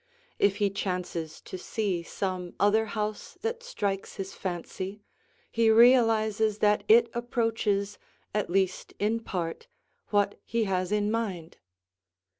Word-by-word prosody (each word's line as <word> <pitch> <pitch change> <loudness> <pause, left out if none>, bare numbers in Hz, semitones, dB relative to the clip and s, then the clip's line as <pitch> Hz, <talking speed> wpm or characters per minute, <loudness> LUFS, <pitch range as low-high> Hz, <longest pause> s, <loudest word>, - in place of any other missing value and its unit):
If 200 -1 +4
he 205 -1 +1
chances 180 -5 -3
to 185 - -8
see 195 -3 -1
some 180 0 -4
other 215 +2 +4
house 215 -1 -4
that 465 +1 -2
strikes 200 - -3
his 195 0 -5
fancy, 190 +2 -5 0.5
he 225 -1 +3
realizes 220 -2 +5
that 210 -1 +3
it 235 +2 +7
approaches, 225 -4 -1 0.3
at 210 -4 -1
least 190 0 0
in 215 +3 +1
part, 180 - -4 0.4
what 205 -1 +1
he 230 0 0
has 185 -2 -1
in 210 0 +1
mind. 190 -8 -3
205 Hz, 125 wpm, -28 LUFS, 190-225 Hz, 0.5 s, it